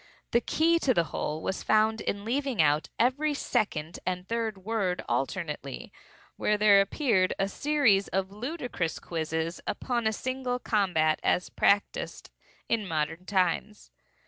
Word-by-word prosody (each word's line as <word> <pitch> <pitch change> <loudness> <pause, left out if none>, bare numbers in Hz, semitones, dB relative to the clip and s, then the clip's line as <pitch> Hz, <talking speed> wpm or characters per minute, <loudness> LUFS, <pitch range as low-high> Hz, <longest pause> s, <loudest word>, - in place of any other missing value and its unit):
The 235 - +3
key 335 +5 +2
to 260 -6 +2
the 170 - +4
whole 155 +1 -3
was 190 - -2
found 215 0 +2
in 200 +1 -3
leaving 265 0 -1
out 150 0 +3
every 285 +5 +2
second 175 - -1
and 180 0 -3
third 225 -3 -2
word 205 -5 -1
alternately, 140 +2 -3 0.4
when 210 - +1
there 205 -1 +6
appeared 195 -3 +1
a 195 - +1
series 240 -4 +2
of 190 0 -2
ludicrous 245 - -3
quizzes 160 0 -3
upon 240 -3 -1
a - - +2
single 255 +2 -2
combat 180 -10 +1
as 180 - +1
practised 200 0 0 0.4
in 220 -3 0
modern 160 +2 -2
times. 195 +2 -1
200 Hz, 140 wpm, -28 LUFS, 175-240 Hz, 0.4 s, there